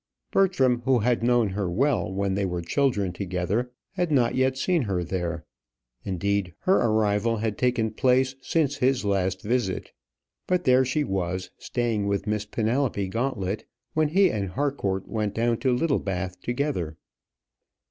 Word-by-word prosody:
Bertram, 135 -11 +3
who 130 -1 +4
had 120 +1 +1
known 120 -2 +3
her 95 -1 -2
well 125 +5 +1
when 100 0 -1
they 100 +1 0
were 90 -2 -2
children 100 - +1
together, 95 +6 -2 0.2
had 175 -4 -1
not 125 -5 +3
yet 130 0 +1
seen 170 +4 +1
her 95 -3 -1
there; 85 -2 -3 0.6
indeed, 95 -1 -1
her 190 - +4
arrival 110 0 +2
had 110 -1 -1
taken 120 -3 +1
place 130 +3 +2
since 145 -1 0
his 130 -3 +1
last 95 -2 0
visit; 115 -4 -1 0.6
but 180 -1 +1
there 130 0 +5
she 130 +4 0
was, 95 -4 -2
staying 115 -4 -1
with 100 -1 -1
Miss 105 -1 -1
Penelope 115 -3 0
Gauntlet, 110 -3 -2 0.3
when 155 -1 +2
he 185 +4 +4
and 100 -3 -2
Harcourt 100 -6 -1
went 105 -2 -2
down 115 0 +1
to 130 - +1
Littlebath 100 - -1
together. 120 - -2
110 Hz, 150 wpm, -26 LUFS, 95-130 Hz, 0.6 s, there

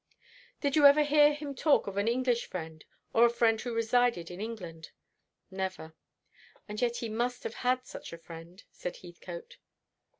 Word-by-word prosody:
"Did 285 -1 +1
you 295 -2 +8
ever 290 +2 +6
hear 295 0 +5
him 290 -1 -5
talk 285 +2 +3
of 200 - -5
an 200 +2 0
English 245 0 +1
friend, 160 -3 -7 0.3
or 230 - +5
a 240 - +7
friend 230 -2 +2
who 245 - -4
resided 230 -5 +1
in 180 +3 -7
England?" 180 -8 -7 0.6
"Never." 190 -4 -4 0.7
"And 210 0 -5
yet 240 -1 +1
he 235 - -3
must 240 +3 -2
have - - -4
had 255 0 +1
such - - -9
a 170 - -7
friend," 165 +3 -12
said - - -6
Heathcote. 485 -1 -10
235 Hz, 170 wpm, -30 LUFS, 190-260 Hz, 0.7 s, you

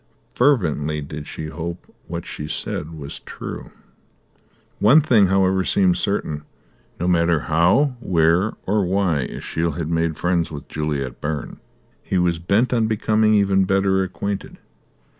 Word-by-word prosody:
Fervently 80 - +1
did 75 +1 -7
she 80 - -6
hope 85 +2 -6
that - - -27
what 85 0 -5
she 75 - -6
said 80 +1 -3
was 70 -2 -7
true. - - -8 1.1
One 120 +10 +7
thing, 120 -10 +4
however, 95 0 +2
seemed 95 -1 +2
certain. 80 -7 -1 0.6
No 90 - -1
matter 85 -3 +2
how, 90 - +2
where, 90 0 +2
or 105 +1 +1
why, 90 -4 +1
Ashiel 85 0 -2
had 80 +1 -4
made 80 -1 0
friends 85 -1 0
with 75 -2 -8
Juliet 70 -5 -3
Byrne, 75 -1 -4 0.4
he 95 - -2
was 85 -2 +1
bent 100 +9 +1
on 115 -2 +2
becoming 110 0 +2
even 95 -2 +3
better 95 0 +2
acquainted. 95 +2 -4
90 Hz, 140 wpm, -21 LUFS, 80-100 Hz, 1.1 s, One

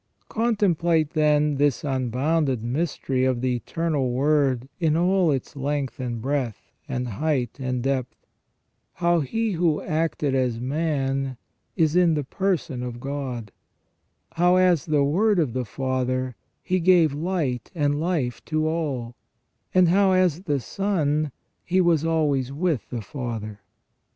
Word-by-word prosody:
Contemplate, 175 -9 +1
then, 150 -1 +2
this 145 -2 +1
unbounded 135 0 0
mystery 135 0 -1
of 130 -2 +1
the 125 -1 +1
Eternal 150 0 -1
Word 135 -1 +1
in 160 -2 +2
all 180 0 +3
its 140 +1 -2
length 140 -2 -2
and 120 -2 -3
breadth, 130 -3 -3 0.2
and 125 0 -2
height 125 +2 -1
and 125 -2 -2
depth; 130 -2 -2 0.7
how 175 -1 +2
He 225 - -1
who 165 -4 +1
acted 155 -3 -1
as 125 -3 0
man 135 -1 -1 0.4
is 160 -3 +2
in 175 -3 +4
the 150 - -1
person 170 -4 -2
of 120 -1 -5
God; 130 -5 -5 0.8
how, 175 +2 +3
as 180 -5 +3
the 150 -2 +3
Word 200 +9 +2
of 150 -9 +1
the 130 -1 -2
Father, 130 +1 -2 0.3
He 185 0 0
gave 170 -4 +4
light 150 -6 -2
and 145 -2 +1
life 155 -8 -1
to 155 0 0
all; 140 -8 -2 0.6
and 185 -1 +5
how, 190 +1 +4
as 180 -3 +2
the 145 -4 +1
Son, 155 - -1 0.3
He 185 +2 +1
was 170 -4 +3
always 150 -5 +1
with 155 -2 -1
the 120 -4 -4
Father. 110 -5 -5
145 Hz, 140 wpm, -24 LUFS, 130-165 Hz, 0.8 s, and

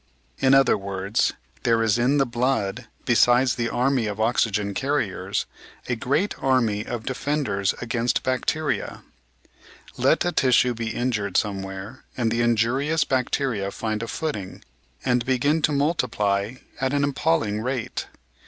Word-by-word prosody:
In 135 0 +5
other 135 -6 +4
words, 100 +2 -1 0.3
there 115 -1 +2
is 115 +1 +2
in 130 +4 +3
the 135 - +3
blood, 120 -2 -1 0.2
besides 120 +2 +4
the 115 -2 -2
army 125 -1 +1
of 105 0 -4
oxygen 110 -3 +1
carriers, 135 -4 -1 0.4
a 120 - 0
great 145 - 0
army 115 -6 +1
of 115 -1 -5
defenders 130 -8 -1
against 120 0 0
bacteria. 135 +4 -1 0.9
Let - - +3
a 175 - +1
tissue 125 -4 +3
be 115 -1 -4
injured 110 -5 -1
somewhere, 95 +3 -3
and 115 -3 +1
the 115 +1 +1
injurious 125 +7 +2
bacteria 125 -5 -1
find 110 +1 -3
a 115 - -4
footing 115 - -4 0.4
and 125 -1 +2
begin 140 +5 +1
to 150 - +2
multiply 120 -8 0 0.2
at 135 +1 0
an 145 0 +2
appalling 140 -6 0
rate. 125 0 -3
120 Hz, 135 wpm, -24 LUFS, 110-135 Hz, 0.9 s, In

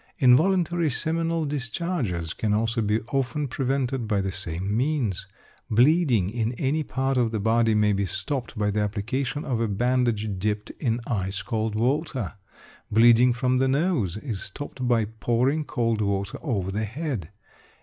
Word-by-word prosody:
Involuntary 165 +4 +4
seminal 165 +2 -1
discharges 125 - -2
can 105 -2 0
also 115 +1 0
be 105 +1 +1
often 135 +2 0
prevented 130 -2 -1
by 105 -2 +1
the 95 0 -1
same 95 +2 -3
means. 125 - 0 0.4
Bleeding 125 - +3
in 115 0 -1
any 140 +5 0
part 135 -2 -1
of 120 -2 +2
the 110 -1 -2
body 115 +1 +2
may 105 -1 +3
be 100 0 0
stopped 120 +6 -3
by 105 -1 +1
the 105 - -1
application 120 +8 -2
of 120 -4 -1
a 115 - +1
bandage 110 -2 0
dipped 105 +1 -2
in 120 -4 0
ice 95 -3 -2
cold 110 -1 -2
water. 130 - -1 0.6
Bleeding 120 +3 +6
from 125 +1 +1
the 135 - +3
nose 135 - +1
is 110 -5 -4
stopped 130 +4 -6
by 115 -3 +3
pouring 120 +7 0
cold 115 -5 0
water 100 -1 -1
over 100 - -2
the 105 +3 -1
head. 120 - -4
120 Hz, 155 wpm, -25 LUFS, 105-135 Hz, 0.6 s, Bleeding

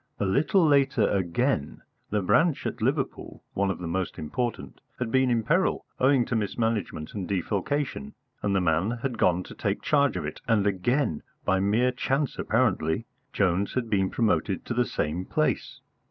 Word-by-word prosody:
A 100 - +1
little 155 - +3
later, 135 -7 +3
again, 95 - 0 0.3
the 105 -1 0
branch 165 - +2
at 125 - -4
Liverpool, 135 +4 -2
one 100 0 +1
of 95 - -2
the 90 - -6
most 90 +2 -2
important, 120 +10 -4 0.2
had 120 -3 -3
been 130 0 +3
in 115 -2 +1
peril 165 - +1
owing 130 -2 +4
to 120 - -2
mismanagement 110 -6 -2
and 95 -4 -4
defalcation, 100 - -2 0.3
and 100 -1 0
the 95 - +3
man 85 +3 +1
had 125 -4 -2
gone 90 +1 +3
to - - -11
take - - -2
charge 140 -8 +2
of 80 - -3
it, 75 - -6
and 110 -3 +3
again, 100 - 0 0.2
by 95 - +2
mere 110 +6 +2
chance 135 +3 -1
apparently, 110 -5 +1 0.3
Jones 95 0 +1
had 120 -3 -2
been 95 -2 +2
promoted 105 -4 0
to - - -3
the 120 +1 +2
same 80 -1 -2
place. - - -1
110 Hz, 170 wpm, -27 LUFS, 95-130 Hz, 0.3 s, owing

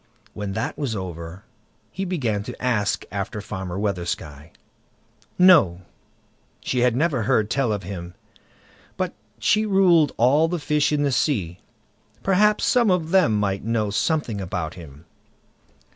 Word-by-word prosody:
When 105 -2 -5
that 110 +8 -3
was 135 -7 -2
over, 90 0 -7 0.5
he 195 - -4
began 125 - -1
to 125 - -8
ask 115 -5 0
after 100 +2 -4
Farmer 95 -3 -6
Weathersky. 85 -6 -4 0.9
"No! 155 - +5 0.8
she 125 - -2
had 120 -1 +3
never 145 -3 +1
heard 110 0 +1
tell 135 -5 +1
of 100 -2 -3
him; 90 -1 -7 0.8
but - - -2 0.2
she 215 +1 +2
ruled 185 -7 +4
all 140 +7 +4
the 175 +1 -2
fish 150 -1 +1
in 145 -1 +1
the 140 - +1
sea; 110 - -1 0.6
perhaps 210 +2 +3
some 240 -4 +3
of 170 -3 0
them 160 - +3
might 100 -1 -1
know 110 -2 -1
something 115 -3 -1
about 90 -3 -4
him." 80 -3 -13
110 Hz, 140 wpm, -23 LUFS, 95-155 Hz, 0.9 s, No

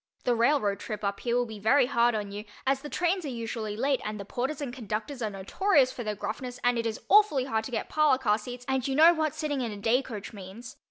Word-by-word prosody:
The 245 - +2
railroad 235 -4 +2
trip 215 -2 -6
up 200 0 -1
here 240 -1 -1
will 245 0 +2
be 220 -2 -8
very 250 +6 +4
hard 240 -2 +2
on 205 -2 -3
you, 205 +1 -6 0.2
as 270 0 +1
the 295 - -7
trains 360 +3 0
are - - -4
usually 225 -3 -4
late 270 +2 +1
and 210 0 -4
the 200 - -6
porters 265 +8 -3
and 275 -5 -4
conductors 230 +3 -4
are 220 - 0
notorious 255 - +2
for 245 - -6
their 210 -1 -2
gruffness 245 +5 -5
and 245 -1 +2
it 230 - -1
is 220 - -4
awfully 405 -11 +5
hard 220 -4 -1
to 260 - -7
get 225 - -2
parlor 305 -4 +3
car 220 -5 +1
seats 245 +3 -8
and 265 0 0
you 270 - -1
know 325 +4 +8
what 310 -2 -1
sitting 300 -3 -2
in 235 -3 -2
a 205 - -7
day 230 +6 +2
coach 225 -5 -8
means. 205 +4 -10
245 Hz, 260 wpm, -28 LUFS, 215-275 Hz, 0.2 s, know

